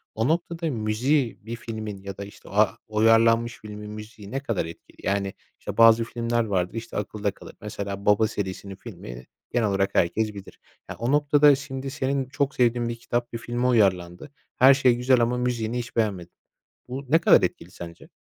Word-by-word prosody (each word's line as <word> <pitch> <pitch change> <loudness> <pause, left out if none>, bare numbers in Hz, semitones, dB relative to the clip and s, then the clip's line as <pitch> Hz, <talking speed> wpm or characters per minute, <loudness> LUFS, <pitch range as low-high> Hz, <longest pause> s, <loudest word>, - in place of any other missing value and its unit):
O 110 +2 0
noktada 165 0 -1
müziği 115 +2 0
bir 115 - -4
filmin 110 -4 -6
ya 100 -1 -7
da, 100 - -6
işte, 100 - -14
a 105 +1 +2
uyarlanmış 115 +2 +3
filmin 105 0 -8
müziği 105 -1 -10
ne 135 - -1
kadar 115 -7 -2
etkili? 85 - -11
Yani, 100 0 0 0.3
işte, 100 - -7
bazı 115 0 +7
filmler 115 0 -1
vardır, 90 -3 -1
işte, 115 0 -6
akılda 105 0 -2
kalır. - - -13
Mesela 100 -1 -5
"Baba" 105 +1 +4
serisinin 100 -2 -5
filmleri - - -10 0.2
genel 120 -3 +1
olarak 100 0 0
herkes 105 +5 +1
bilir. 100 -1 -11 0.3
Ya, - - -5
o 120 +3 0
noktada 145 0 +5
şimdi 135 0 -6
senin 135 0 -1
çok 140 +1 -1
sevdiğin 120 -1 +2
bir 120 - -3
kitap, 120 +1 -3
bir - - -2
filme 120 +2 -2
uyarlandı. 95 -1 +1 0.2
Her 135 +2 +7
şey 130 -3 +3
güzel 125 0 +3
ama 120 +1 +1
müziğini 120 -2 -1
hiç 120 - -7
beğenmedin. 100 -6 -1 0.6
Bu 135 +3 -5
ne 160 - +5
kadar 170 - +6
etkili - - -3
sence? 85 -1 -10
115 Hz, 180 wpm, -25 LUFS, 100-125 Hz, 0.6 s, bazı